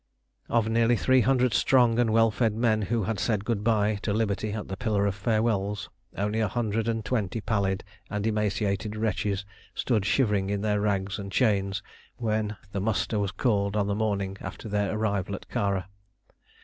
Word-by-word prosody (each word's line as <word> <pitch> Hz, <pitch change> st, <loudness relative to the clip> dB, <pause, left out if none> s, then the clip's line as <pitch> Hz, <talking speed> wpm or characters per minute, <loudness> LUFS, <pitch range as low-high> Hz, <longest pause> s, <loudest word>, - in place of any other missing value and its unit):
Of 115 Hz, -2 st, +2 dB
nearly 115 Hz, +1 st, +3 dB
three 130 Hz, +2 st, +4 dB
hundred 125 Hz, 0 st, +3 dB
strong 120 Hz, -3 st, +4 dB
and 120 Hz, -2 st, +3 dB
well 115 Hz, 0 st, +4 dB
fed 110 Hz, -1 st, +1 dB
men 110 Hz, -2 st, +2 dB
who 110 Hz, +2 st, 0 dB
had 105 Hz, +2 st, -2 dB
said 105 Hz, -3 st, 0 dB
good 110 Hz, -3 st, -1 dB
bye 105 Hz, -2 st, +2 dB
to 110 Hz, -, -1 dB
liberty 105 Hz, 0 st, 0 dB
at 105 Hz, 0 st, -4 dB
the 95 Hz, -, -4 dB
Pillar 105 Hz, -2 st, 0 dB
of 100 Hz, -, +1 dB
Farewells, 105 Hz, -1 st, 0 dB, 0.3 s
only 105 Hz, +2 st, 0 dB
a 110 Hz, -, +2 dB
hundred 110 Hz, +1 st, -1 dB
and 115 Hz, -1 st, -1 dB
twenty 110 Hz, -3 st, -1 dB
pallid 100 Hz, -3 st, 0 dB, 0.3 s
and 105 Hz, 0 st, -2 dB
emaciated 105 Hz, -1 st, 0 dB
wretches 105 Hz, -2 st, -1 dB, 0.3 s
stood 110 Hz, -6 st, +1 dB
shivering 105 Hz, -3 st, +2 dB
in 100 Hz, -1 st, -1 dB
their 105 Hz, -1 st, +1 dB
rags 100 Hz, 0 st, -1 dB
and 100 Hz, -1 st, -6 dB
chains 100 Hz, -4 st, +1 dB, 0.3 s
when 110 Hz, -2 st, -1 dB
the 100 Hz, -, -2 dB
muster 110 Hz, +1 st, 0 dB
was 100 Hz, -1 st, 0 dB
called 100 Hz, -1 st, 0 dB
on 105 Hz, -, +2 dB
the 100 Hz, -, 0 dB
morning 100 Hz, -2 st, -1 dB
after -, -, -7 dB
their 105 Hz, -1 st, 0 dB
arrival 100 Hz, -3 st, -1 dB
at -, -, -10 dB
Kara. 100 Hz, -3 st, -1 dB
105 Hz, 180 wpm, -27 LUFS, 100-115 Hz, 0.3 s, three